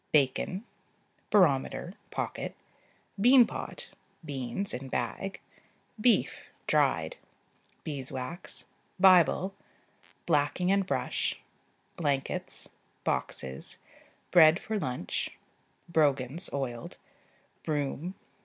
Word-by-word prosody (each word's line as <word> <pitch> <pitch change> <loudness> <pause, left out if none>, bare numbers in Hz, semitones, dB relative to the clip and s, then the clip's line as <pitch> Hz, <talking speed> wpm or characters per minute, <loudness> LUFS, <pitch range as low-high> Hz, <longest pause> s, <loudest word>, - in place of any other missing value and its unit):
Bacon. 150 - +2 0.6
Barometer 175 -2 +3 0.2
(pocket). - - -4 0.7
Bean 250 +2 +8
pot. - - -6 0.3
Beans 140 +6 -2
(in 130 +2 -5
bag). 125 +12 -3 0.6
Beef 240 +1 +2 0.2
(dried). - - +2 0.7
Beeswax. 135 +2 -4 0.3
Bible. 185 0 +6 0.7
Blacking 160 +4 +2
and 195 -1 +2
brush. - - -1 0.6
Blankets. 140 -5 -1 0.4
Boxes. 65 0 -3 0.5
Bread 165 0 +7
for 220 -1 -2
lunch. 125 - -3 0.5
Brogans 150 -1 +2
(oiled). 125 -4 -4 0.7
Broom. 155 +4 -2
155 Hz, 75 wpm, -30 LUFS, 135-190 Hz, 0.7 s, Bean